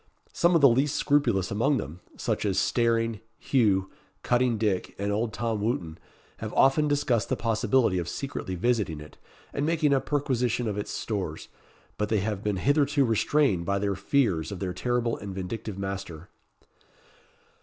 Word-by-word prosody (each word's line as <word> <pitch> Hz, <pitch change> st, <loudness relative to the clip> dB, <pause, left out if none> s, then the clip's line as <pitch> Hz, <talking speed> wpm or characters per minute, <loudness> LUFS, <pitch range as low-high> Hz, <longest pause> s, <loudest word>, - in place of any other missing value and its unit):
Some 170 Hz, +1 st, +3 dB
of 165 Hz, -, +4 dB
the 140 Hz, -, +9 dB
least 135 Hz, +4 st, +2 dB
scrupulous 120 Hz, -11 st, +1 dB
among 130 Hz, +8 st, +2 dB
them 80 Hz, -, -6 dB, 0.2 s
such -, -, -1 dB
as -, -, 0 dB
Staring, 115 Hz, -2 st, +1 dB, 0.2 s
Hugh, 100 Hz, -7 st, +1 dB, 0.3 s
Cutting 120 Hz, -1 st, +2 dB
Dick, 105 Hz, -4 st, -1 dB
and 100 Hz, +1 st, -2 dB
old 110 Hz, +2 st, -1 dB
Tom 110 Hz, 0 st, -2 dB
Wootton 90 Hz, -7 st, -2 dB, 0.4 s
have 110 Hz, -1 st, -5 dB
often 135 Hz, +3 st, +4 dB
discussed 135 Hz, -6 st, +1 dB
the -, -, +1 dB
possibility 115 Hz, -3 st, +1 dB
of 85 Hz, -, -4 dB
secretly 135 Hz, -9 st, -4 dB
visiting 100 Hz, -6 st, 0 dB
it, 75 Hz, 0 st, -13 dB, 0.3 s
and 140 Hz, -, -1 dB
making 155 Hz, -2 st, +2 dB
a 135 Hz, -, +2 dB
perquisition 125 Hz, -5 st, 0 dB
of 105 Hz, -, -2 dB
its 105 Hz, -, -5 dB
stores; 95 Hz, -8 st, -4 dB, 0.5 s
but 105 Hz, 0 st, 0 dB
they 110 Hz, -3 st, +1 dB
have 105 Hz, 0 st, -3 dB
been 105 Hz, -3 st, -1 dB
hitherto 140 Hz, -, +2 dB
restrained 115 Hz, -, +2 dB
by 100 Hz, -, +1 dB
their 100 Hz, 0 st, 0 dB
fears 95 Hz, -, 0 dB
of 100 Hz, -, -5 dB
their 90 Hz, -1 st, -3 dB
terrible 120 Hz, +4 st, -1 dB
and 100 Hz, -2 st, -7 dB
vindictive 100 Hz, +2 st, -5 dB
master. 95 Hz, -3 st, -6 dB
110 Hz, 165 wpm, -27 LUFS, 95-130 Hz, 0.5 s, the